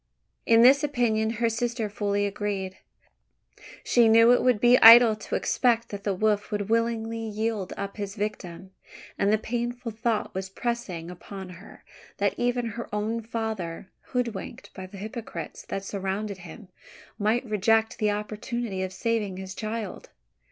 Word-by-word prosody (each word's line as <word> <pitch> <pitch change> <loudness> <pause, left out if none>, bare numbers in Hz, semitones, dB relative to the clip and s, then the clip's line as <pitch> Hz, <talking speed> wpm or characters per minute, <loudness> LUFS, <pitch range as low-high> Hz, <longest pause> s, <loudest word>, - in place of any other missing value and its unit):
In 230 0 +6
this 275 +4 +6
opinion 235 -6 +1
her 235 0 +2
sister 230 0 -1
fully 205 0 -1
agreed. 200 -2 -3 1.1
She 240 -2 +4
knew 230 +1 +7
it 245 - +4
would 250 -4 +3
be 245 +2 +6
idle 230 -1 +10
to 215 - -5
expect 235 -2 +1
that 200 -1 -7
the 200 -2 0
wolf 210 +1 +1
would 205 -1 -3
willingly 230 0 0
yield 220 -3 -3
up 200 +1 -5
his 200 -1 -5
victim; 190 -4 -5 0.5
and 200 +1 +3
the 215 - +4
painful 240 +2 -4
thought 220 0 -2
was 190 0 -4
pressing 190 -6 -4
upon 190 +1 -9
her 180 +2 -13 0.3
that - - +1
even 245 0 0
her 230 +2 -7
own 215 +2 -2
father, 215 -6 -5
hoodwinked 235 -6 -4
by 190 0 -8
the 195 - -12
hypocrites 220 +3 -7
that 195 - -4
surrounded 195 +1 -3
him, 180 +3 -12 0.5
might 220 +5 +1
reject 220 +1 +1
the 215 - +2
opportunity 210 0 -3
of 190 -1 -3
saving 210 -3 -1
his 190 0 -7
child! 215 -1 -5
215 Hz, 150 wpm, -26 LUFS, 200-230 Hz, 1.1 s, idle